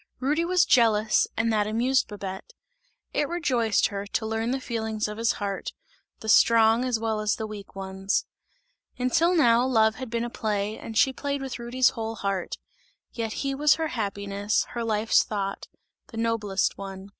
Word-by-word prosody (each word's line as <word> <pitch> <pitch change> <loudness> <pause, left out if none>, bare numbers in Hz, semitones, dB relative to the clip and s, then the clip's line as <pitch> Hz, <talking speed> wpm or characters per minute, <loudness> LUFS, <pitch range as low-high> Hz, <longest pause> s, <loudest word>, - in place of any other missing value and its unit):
Rudy 295 +6 +1
was 360 0 +3
jealous 220 -3 +3
and 225 0 +1
that 210 -1 +1
amused 245 +5 +1
Babette; 200 - -7 0.6
it 290 - 0
rejoiced 245 - +1
her, 200 0 -5
to 220 - -2
learn 225 +1 -2
the 265 +2 -1
feelings 220 -4 -3
of 210 +1 -7
his 230 +1 +2
heart, 200 -2 -4 0.5
the 220 - -8
strong 225 +1 +5
as 250 -3 0
well 220 -1 -2
as 215 -1 0
the 220 - -4
weak 210 -2 -9
ones. 190 0 -2 0.7
Until 315 +8 +2
now 240 -7 +4
love 220 -4 +3
had 260 -1 -6
been 230 0 -1
a - - -4
play 210 -1 -2
and 225 -1 -7
she 265 - +4
played 280 0 -3
with 260 -2 -5
Rudy's 245 +2 +2
whole 225 -1 -5
heart; 195 -3 -3 0.6
yet 225 -2 -3
he 275 - 0
was 290 +2 +4
her 320 -1 -2
happiness, 200 -2 -1
her 235 - -4
life's 220 0 +3
thought, 195 -2 -4 0.4
the 225 - -10
noblest 215 -5 0
one! 195 0 -8
225 Hz, 175 wpm, -26 LUFS, 210-250 Hz, 0.7 s, strong